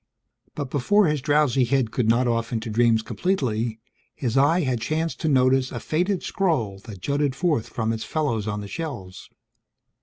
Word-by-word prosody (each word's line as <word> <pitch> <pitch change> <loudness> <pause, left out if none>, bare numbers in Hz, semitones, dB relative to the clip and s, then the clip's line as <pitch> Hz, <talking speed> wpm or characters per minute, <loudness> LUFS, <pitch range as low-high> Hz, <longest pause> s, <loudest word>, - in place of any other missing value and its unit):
But 140 -3 -4
before 200 +10 +3
his 150 -3 0
drowsy 145 -2 +3
head 125 -2 +1
could 115 -2 0
nod 120 +2 +3
off 115 0 -1
into 110 -1 -3
dreams 115 0 +3
completely, 115 - -1 0.4
his 120 -3 -2
eye 145 +6 +4
had 130 -6 -1
chanced 160 +7 -2
to 160 - 0
notice 130 -1 +3
a - - -4
faded 180 +4 -1
scroll 130 - -1
that 105 -6 -9
jutted 140 +1 0
forth 155 -7 0
from 115 -2 -1
its 110 - -4
fellows 120 -9 -1
on 105 0 -2
the 100 - -7
shelves. 120 - -7
130 Hz, 175 wpm, -24 LUFS, 115-150 Hz, 0.4 s, eye